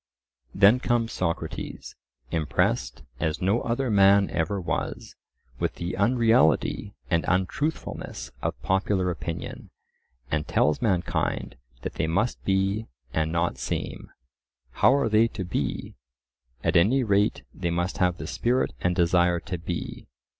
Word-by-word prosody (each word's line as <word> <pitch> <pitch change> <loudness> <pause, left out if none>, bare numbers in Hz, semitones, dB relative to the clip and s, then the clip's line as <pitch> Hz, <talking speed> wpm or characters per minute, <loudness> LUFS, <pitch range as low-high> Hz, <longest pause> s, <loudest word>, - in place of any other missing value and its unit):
Then 100 +6 +6
comes 120 -2 0
Socrates, 85 -2 -4 0.4
impressed 80 -4 0 0.2
as 80 0 -1
no 100 +6 +1
other 120 +1 -1
man 100 -1 +5
ever 85 +5 -1
was, 90 - -3 0.5
with - - -1
the 85 +1 -4
unreality 110 - +2 0.2
and 85 -1 +3
untruthfulness 95 - -2
of - - -2
popular 95 -1 +1
opinion, 85 -1 -6 0.6
and 75 0 -1
tells 75 - +2
mankind 95 -7 0 0.3
that - - -4
they - - -1
must 95 +9 0
be 95 +3 0 0.3
and 80 0 0
not 85 +1 0
seem. - - -4 0.6
How 60 - +4
are 140 -4 +2
they 110 +1 +4
to 105 -4 -5
be? 70 -5 -3 0.7
At 85 +1 +1
any 110 +11 +4
rate 100 -2 +2
they 85 - -2
must 85 +4 -1
have 90 -2 +2
the - - -6
spirit 125 +2 0
and 90 0 +1
desire 85 0 +3
to 90 -2 -4
be. 85 +1 -5
95 Hz, 130 wpm, -26 LUFS, 85-110 Hz, 0.7 s, Then